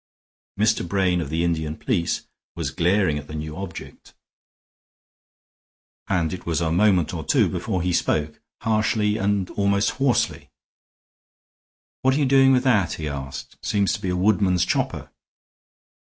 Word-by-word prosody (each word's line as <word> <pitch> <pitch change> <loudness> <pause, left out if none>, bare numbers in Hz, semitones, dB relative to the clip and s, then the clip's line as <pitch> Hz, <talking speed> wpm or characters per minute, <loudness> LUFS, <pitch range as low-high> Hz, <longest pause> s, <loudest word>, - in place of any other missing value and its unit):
Mr. 110 -4 +2
Brain 90 -1 +1
of 75 - -5
the 80 +2 0
Indian 80 -2 -1
police 90 -10 -1 0.3
was - - -3
glaring 90 -3 +1
at 75 - -11
the 75 - -8
new 75 0 -5
object, 95 -2 -9 1.9
and 85 -4 0
it 90 - -7
was 85 -1 -1
a 80 -2 0
moment 90 -2 +3
or 80 -2 -4
two - - +3
before 95 -6 -2
he 90 -1 0
spoke, 75 -2 -1 0.2
harshly 110 -1 +1
and 100 -3 0
almost 100 +2 +1
hoarsely. 120 -4 0 1.5
"What 130 0 +3
are - - +1
you 145 - +2
doing 135 0 +5
with 130 -1 +3
that?" 110 -9 +2
he 75 - -5
asked. 70 -2 -7
"Seems 100 -3 +1
to - - -4
be 95 - -2
a 90 - -1
woodman's 95 -2 +2
chopper." - - -2
95 Hz, 150 wpm, -23 LUFS, 85-105 Hz, 1.9 s, doing